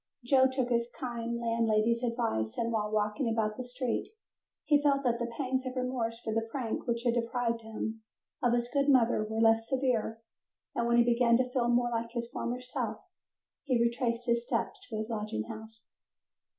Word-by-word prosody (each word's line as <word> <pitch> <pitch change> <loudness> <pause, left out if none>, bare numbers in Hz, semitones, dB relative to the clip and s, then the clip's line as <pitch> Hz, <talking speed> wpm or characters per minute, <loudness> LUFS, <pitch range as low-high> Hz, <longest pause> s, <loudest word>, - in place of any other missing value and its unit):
Joe 260 +1 +5
took 260 -2 -1
his 235 -1 +1
kind 235 -2 -3
landlady's 230 0 +2
advice, 230 - -1
and 230 0 0
while 210 -2 0
walking 215 +4 0
about 220 -1 0
the 255 - -5
streets 250 -1 -2 0.6
he 290 -1 +4
felt 280 -1 +3
that 235 -2 +1
the 235 - -1
pangs 260 -2 0
of 255 - -5
remorse 250 -3 -2
for 220 -2 -3
the 225 - +2
prank 230 +1 -4
which 235 0 0
had 240 -2 +2
deprived 235 0 0
him 220 0 -5 0.4
of 240 -1 +3
his 240 0 +1
good 280 +2 +1
mother 240 -5 +4
were 220 +1 -3
less 225 0 +4
severe, 245 -4 0 0.5
and 235 - 0
when 235 0 +3
he 240 - +7
began 235 0 +4
to 250 0 0
feel 250 -2 +1
more 240 0 +2
like 230 0 -1
his 235 -1 -2
former 245 +1 -3
self 250 0 -3 0.7
he 255 -5 +2
retraced 235 0 0
his 235 -1 +2
steps 235 -1 -2
to 220 - -3
his 215 +1 -3
lodging 210 - -2
house. 220 - -10
235 Hz, 190 wpm, -31 LUFS, 225-250 Hz, 0.7 s, he